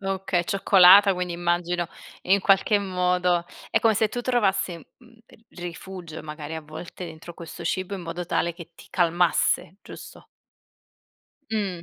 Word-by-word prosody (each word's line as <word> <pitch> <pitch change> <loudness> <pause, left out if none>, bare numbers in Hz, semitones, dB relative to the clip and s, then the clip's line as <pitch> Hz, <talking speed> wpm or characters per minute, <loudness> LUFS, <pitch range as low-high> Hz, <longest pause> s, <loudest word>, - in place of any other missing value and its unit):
Okay, 195 -2 -1
cioccolata 195 +1 +6
quindi 180 -1 -3
immagino 175 0 -1 0.3
in 195 +2 +3
qualche 195 +2 +3
modo, 180 -2 0 0.2
è - - +1
come 225 -1 +3
se 215 +1 +2
tu 245 - -4
trovassi, 195 -8 0
mhmm, 235 - -19
ehm, - - -20
rifugio 175 -1 -8
magari 150 0 -7
a 160 - -4
volte 170 +3 -9
entro 165 +1 -11
questo 170 0 -9
cibo 185 +3 -2
in 185 - -8
modo 170 +1 -5
tale 170 0 -1
che 170 -1 -11
ti - - -15
calmasse, 175 0 +1
giusto? - - -12 1.3
Mh. 195 -6 -2
180 Hz, 145 wpm, -24 LUFS, 170-195 Hz, 1.3 s, cioccolata